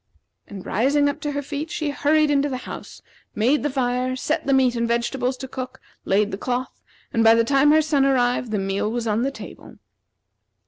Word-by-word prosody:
And 195 -3 -9
rising 280 +7 +2
to 295 - -4
her 285 0 -3
feet, 290 +3 -5
she 310 -3 -2
hurried 300 +1 +2
into 285 0 +2
the 260 - -3
house, - - -9 0.3
made 250 +8 +2
the 295 - -1
fire, 255 -1 -1
set 260 - -2
the - - +2
meat 260 -2 +3
and 235 0 0
vegetables 245 +2 -1
to 265 - -7
cook, 255 0 -7 0.3
laid 205 +2 +1
the 195 - -5
cloth, 250 +2 -3 0.3
and 230 - +2
by 225 0 +7
the 230 - +3
time 275 +4 +3
her 310 +1 +5
son 295 -3 +2
arrived 250 -2 +1
the 215 - -1
meal 195 +2 -1
was 235 0 -3
on 215 0 0
the 265 - +1
table. 275 - -11
255 Hz, 200 wpm, -22 LUFS, 235-285 Hz, 0.3 s, by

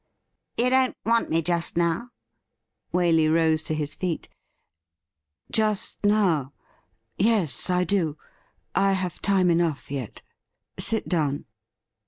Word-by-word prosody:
' - - -53
You 250 +2 +3
don't 260 0 +2
want 230 +1 +2
me 165 +1 +1
just 170 0 -1
now 170 +6 +1
.f" - - -23 0.8
Waley 165 -3 +3
rose 160 -1 +3
to 155 - -2
his 150 -1 -3
feet. 180 -3 -3 0.6
' 80 -2 -34
Just 215 -2 0
now? 185 -10 +2 0.7
Yes, 195 - +1
I 180 0 +2
do. 175 -6 0 0.6
I 195 0 +3
have 185 -3 -3
time 190 -3 +3
enough 165 -5 0
yet. 130 -6 -5 0.6
Sit 220 +2 -1
down.' 150 -5 0
170 Hz, 130 wpm, -25 LUFS, 155-200 Hz, 0.8 s, You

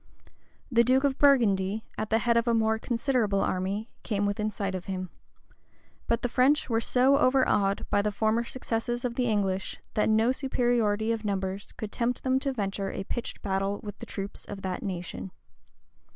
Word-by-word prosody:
[] - - -35
The 235 - +8
duke 260 +3 +3
of 280 -1 +1
Burgundy, 220 -7 +3
at 215 0 -3
the 220 - +3
head 235 +1 +2
of 235 +1 +2
a 235 - +3
more 220 0 +2
considerable 230 -4 0
army, 195 +5 -2
came 205 -3 -1
within 210 +1 0
sight 200 -3 -3
of 185 -1 -5
him; 185 -2 -4 1.0
but 230 0 0
the - - +2
French 260 +3 +2
were 225 0 +2
so 260 +4 +4
overawed 255 -7 +2
by 205 - +4
the 210 +1 0
former 220 +3 +1
successes 240 0 -3
of 245 - -1
the 245 0 0
English, 195 -3 -1
that 210 - +2
no 220 +3 +4
superiority 240 -5 +1
of 225 -1 -2
numbers 195 -1 -3
could 215 -1 -6
tempt 240 +1 -1
them 260 0 +2
to 275 0 -1
venture 200 -4 -2
a 195 - -4
pitched 240 +4 -5
battle 195 0 -1
with 205 -1 -7
the - - -8
troops 195 0 -6
of 200 -1 -8
that 185 -1 -3
nation. 185 -1 -5
220 Hz, 185 wpm, -28 LUFS, 200-245 Hz, 1.0 s, The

